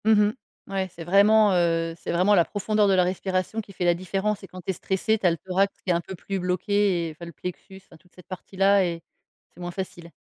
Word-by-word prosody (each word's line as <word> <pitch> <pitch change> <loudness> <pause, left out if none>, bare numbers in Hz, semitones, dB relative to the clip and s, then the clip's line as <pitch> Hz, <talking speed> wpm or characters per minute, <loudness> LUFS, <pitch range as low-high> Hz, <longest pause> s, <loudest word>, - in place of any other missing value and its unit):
Mmh 220 - +5
mh. 210 +1 +1 0.3
Ouais, 195 -1 -2
c'est 170 - -8
vraiment, 200 +3 +5
heu, 165 -2 +1
c'est - - -4
vraiment 185 +4 +3
la 170 -3 +4
profondeur 210 0 +1
de 195 - +3
la 185 -1 +4
respiration 185 +3 -2
qui 205 -2 -15
fait 180 - -4
la 175 - +5
différence 195 +3 -2
et - - -9
quand 185 0 -10
tu 180 - -10
es - - -4
stressé, 195 +5 0
tu 200 - -5
as 175 - +6
le 165 - -2
thorax 190 +4 -1
qui - - -7
est - - +4
un 170 - 0
peu 190 - -8
plus 195 +2 -4
bloqué 185 0 +1
et - - -6
enfin 160 +3 -10
le 170 - -9
plexus, 180 +4 -8
enfin 165 - -17
toute 180 +2 -28
cette 180 - -17
partie-là 195 +1 +1
et 170 -1 -4 0.5
c'est - - -18
moins 175 0 -5
facile. 175 -2 -7
185 Hz, 260 wpm, -25 LUFS, 175-200 Hz, 0.5 s, as